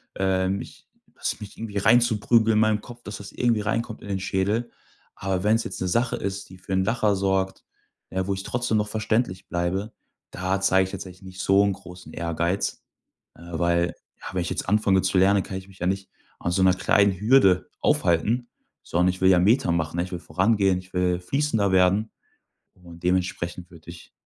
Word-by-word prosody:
ähm, 95 0 +1
mich - - -10 0.3
das - - -3
mich 105 - -10
irgendwie 110 -2 -5
reinzuprügeln 115 0 +4
in 105 - +3
meinem 110 -1 +2
Kopf, 120 0 -12
dass 105 -2 -7
das 100 - -10
irgendwie 120 -3 +1
reinkommt 110 +2 -2
in 100 - -9
den 95 -1 -1
Schädel. 100 +5 -1 0.5
Aber 95 -1 -2
wenn's 110 +2 +3
jetzt - - -7
'ne 95 - 0
Sache 115 +6 +1
ist, 100 0 -4
die 95 - -13
für 95 +1 -6
'n 95 0 +2
Lacher 105 -1 +1
sorgt, 95 0 -1 0.5
ja, 95 0 -2
wo 100 - 0
ich 95 - -6
trotzdem 120 -1 -1
noch 105 0 0
verständlich 110 -3 -1
bleibe, 95 +5 -2 0.4
da 95 +2 -2
zeige 95 -1 +4
ich 95 - -11
jetzt 100 -1 -6
eigentlich 90 +1 -14
nicht 95 0 -11
so 100 +1 +4
'n 100 -1 +1
großen 90 -2 -12
Ehrgeiz, 85 +3 -2 0.5
äh, - - -17 0.2
weil 85 0 +1 0.3
ja, - - -8
wenn 90 - 0
ich 85 - -3
jetzt - - -3
anfange 100 -2 +3
zu 95 - 0
lernen, 100 +2 +4
kann 95 - -6
ich 95 0 -9
mich 95 -1 -18
ja 90 - -1
nicht 95 0 -2 0.3
an 85 - -2
so 95 - +1
'ner 95 -1 +5
kleinen 100 0 +2
Hürde 105 -5 +4
aufhalten, 110 +8 +1 0.3
sondern 90 +2 +1
ich 90 +1 -4
will 95 - +5
ja 90 -2 +6
Meter 100 +1 +3
machen, 80 -1 -1
ne, 85 - +1
ich 90 - -8
will 90 - -4
vorangehen, 95 0 +1
ich 90 0 -15
will 90 -1 +1
fließender 110 -1 0
werden 95 +4 +3 0.6
und 85 -2 -15
dementsprechend 90 -1 -1
würde 85 0 -13
ich, 85 - -13
95 Hz, 205 wpm, -25 LUFS, 90-105 Hz, 0.6 s, ja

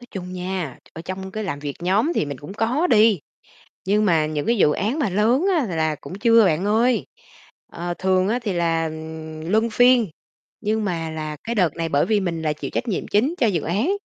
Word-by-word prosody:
Nói 245 - -13
chung 180 -2 -6
nha, 180 -6 -4
ở 160 - -8
trong 190 +1 -6
cái 215 +2 -4
làm 155 -7 -3
việc 145 -1 -5
nhóm 205 - +2
thì - - +1
mình 140 -2 -6
cũng 150 +9 -9
có 245 +10 +1
đi, 220 - +5 0.7
nhưng 210 +2 +2
mà 165 -5 +3
những 155 -1 -3
cái 235 0 +2
dự 150 - +4
án 215 - -1
mà 250 -10 +1
lớn 230 - +2
á 295 - +1
là 185 -6 -4
là 155 -1 0
cũng - - -8
chưa 230 -1 +5
bạn 175 +2 +1
ơi. 230 +4 +2 0.7
Ờ, 175 +1 -4
thường 185 0 +2
á 235 +4 0
thì 205 -4 -1
là, 165 -1 +1
ừm, 160 0 -7
luân 220 +3 +2
phiên, 245 0 +4 0.5
nhưng 215 0 0
mà 165 -4 -2
là 155 -1 -5
cái 235 - -3
đợt 180 -8 +2
này 165 -1 -2
bởi 140 -1 +2
vì 215 -2 +2
mình 170 -4 -2
là 155 -1 0
chịu 150 - -6
trách 245 - -2
nhiệm 200 - -2
chính 255 +11 +1
cho 240 - +3
dự 180 -7 0
án, 210 - 0
190 Hz, 230 wpm, -22 LUFS, 160-220 Hz, 0.7 s, đi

